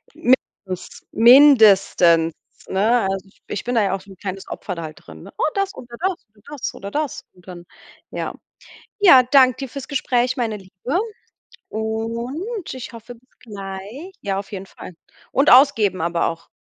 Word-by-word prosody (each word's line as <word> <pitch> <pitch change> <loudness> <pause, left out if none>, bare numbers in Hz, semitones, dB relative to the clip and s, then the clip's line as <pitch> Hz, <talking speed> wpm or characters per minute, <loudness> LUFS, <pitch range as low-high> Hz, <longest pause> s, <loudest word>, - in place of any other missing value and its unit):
Mindest 205 -7 -2
mindestens, 215 - +6 0.3
ne, 220 +6 +2
also, 195 0 -3 0.2
ich 205 - -5
bin 245 +1 -2
da 225 - +3
ja 195 -1 0
auch 195 - -4
so 195 +1 -17
'n 190 - -13
kleines 190 +1 -7
Opfer 185 - -6
da 170 - -7
halt 155 -1 -8
drin. 80 -1 -12
Oh, - - -4
das 395 0 -1
oder 240 -1 -11
das 375 0 0 0.2
und 210 - -26
das 290 -4 -5
oder 200 +1 -8
das 300 +1 -3
und 180 0 -22
dann, 175 -1 -10 0.5
ja. - - -4 0.6
Ja, 345 -11 +8
danke 255 -1 +4
dir 270 -2 -5
fürs 275 +1 -8
Gespräch, 255 -2 0
meine 230 -4 -2
Liebe. 195 - -4 0.7
Und 235 - -4
ich 255 -1 -8
hoffe 230 +2 -11
bis 255 +3 -29
gleich. 205 - -8
Ja, 195 -1 -2
auf 200 - -9
jeden 195 -1 -6
Fall. 185 - -12 0.4
Und 275 +3 +3
ausgeben 225 - +5
aber 170 0 0
auch. 165 0 -6
220 Hz, 170 wpm, -21 LUFS, 190-260 Hz, 0.7 s, Ja